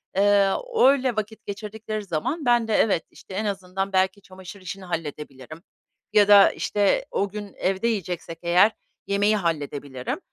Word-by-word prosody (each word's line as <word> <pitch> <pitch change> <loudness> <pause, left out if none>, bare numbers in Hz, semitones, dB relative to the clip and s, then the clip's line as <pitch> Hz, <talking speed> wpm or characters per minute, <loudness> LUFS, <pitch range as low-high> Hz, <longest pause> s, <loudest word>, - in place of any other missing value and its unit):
eee, 200 0 +4 0.3
öyle 265 -2 +4
vakit 215 0 -5
geçirdikleri 215 +1 -5
zaman 200 - -3
ben 240 -2 +3
de 220 - -1
evet, 195 -6 +2
işte - - -13
en 210 +3 -2
azından 195 -1 -3
belki 190 +2 +1
çamaşır 190 0 -12
işini 190 +1 -7
halledebilirim 150 -2 -7 0.5
ya 205 -2 +5
da, 205 -1 +8
işte, 205 -1 0
o 200 - 0
gün 205 -1 -8
evde 190 +4 0
yiyeceksek 180 -6 -3
eğer 180 +5 +4 0.4
yemeği 205 +2 +2
halledebilirim. 145 - -3
195 Hz, 145 wpm, -24 LUFS, 175-210 Hz, 0.5 s, da